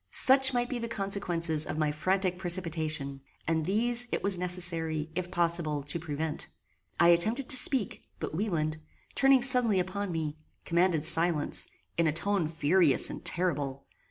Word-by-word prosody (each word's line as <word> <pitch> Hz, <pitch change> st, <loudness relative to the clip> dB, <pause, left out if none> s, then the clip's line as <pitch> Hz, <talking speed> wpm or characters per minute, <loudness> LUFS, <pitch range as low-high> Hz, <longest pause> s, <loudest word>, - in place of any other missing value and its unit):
Such 265 Hz, 0 st, +5 dB
might 245 Hz, -1 st, -1 dB
be 250 Hz, -1 st, -4 dB
the 230 Hz, -, -5 dB
consequences 175 Hz, -7 st, -1 dB
of -, -, -5 dB
my 155 Hz, -1 st, 0 dB
frantic 185 Hz, +3 st, -2 dB
precipitation, 160 Hz, -6 st, -2 dB, 0.3 s
and 160 Hz, -1 st, -1 dB
these, 240 Hz, +4 st, +5 dB
it -, -, -3 dB
was 200 Hz, -1 st, +3 dB
necessary, 170 Hz, -3 st, -2 dB
if 175 Hz, +1 st, -4 dB
possible, 170 Hz, -5 st, -1 dB
to 145 Hz, +4 st, -3 dB
prevent. 155 Hz, -1 st, -4 dB, 0.5 s
I 170 Hz, -, +5 dB
attempted 220 Hz, +10 st, +2 dB
to 280 Hz, -, +6 dB
speak, 255 Hz, -4 st, +4 dB, 0.2 s
but -, -, -6 dB
Wieland, 160 Hz, -5 st, -2 dB, 0.4 s
turning 270 Hz, -2 st, +3 dB
suddenly 245 Hz, -6 st, +4 dB
upon 185 Hz, +2 st, -4 dB
me, 155 Hz, -2 st, -4 dB, 0.3 s
commanded 170 Hz, -2 st, +1 dB
silence, 165 Hz, -2 st, +1 dB, 0.3 s
in 170 Hz, -, +2 dB
a -, -, +1 dB
tone 185 Hz, +2 st, -1 dB
furious 160 Hz, -1 st, +1 dB
and -, -, -9 dB
terrible. 145 Hz, -6 st, -2 dB
175 Hz, 155 wpm, -28 LUFS, 155-200 Hz, 0.5 s, to